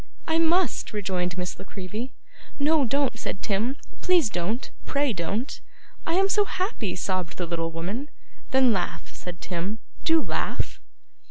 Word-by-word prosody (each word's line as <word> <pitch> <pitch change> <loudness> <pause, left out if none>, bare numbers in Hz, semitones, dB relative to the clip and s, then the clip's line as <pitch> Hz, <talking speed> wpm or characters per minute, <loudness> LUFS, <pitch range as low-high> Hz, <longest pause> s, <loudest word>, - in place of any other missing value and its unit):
'I 325 0 +3
must,' 335 -5 +3
rejoined 185 -4 -1
Miss 180 0 -3
La - - -5
Creevy. 205 +6 -5 0.5
'No, 295 0 +4
don't,' 270 -1 +1
said 195 - -3
Tim. 225 +7 +1 0.2
'Please 345 -11 +5
don't; 205 +7 -1 0.2
pray 280 -3 +2
don't.' 200 - -2 0.5
'I 330 - +2
am 385 +1 +5
so 415 +1 +4
happy!' 370 - -1
sobbed 185 -2 -1
the 180 - -1
little 165 -1 -1
woman. 190 - -3 0.4
'Then 260 -3 +6
laugh,' 185 -3 -2
said 175 -1 -7
Tim. 185 +4 -2 0.3
'Do 325 0 +5
laugh. - - -1
220 Hz, 150 wpm, -27 LUFS, 180-290 Hz, 0.5 s, Then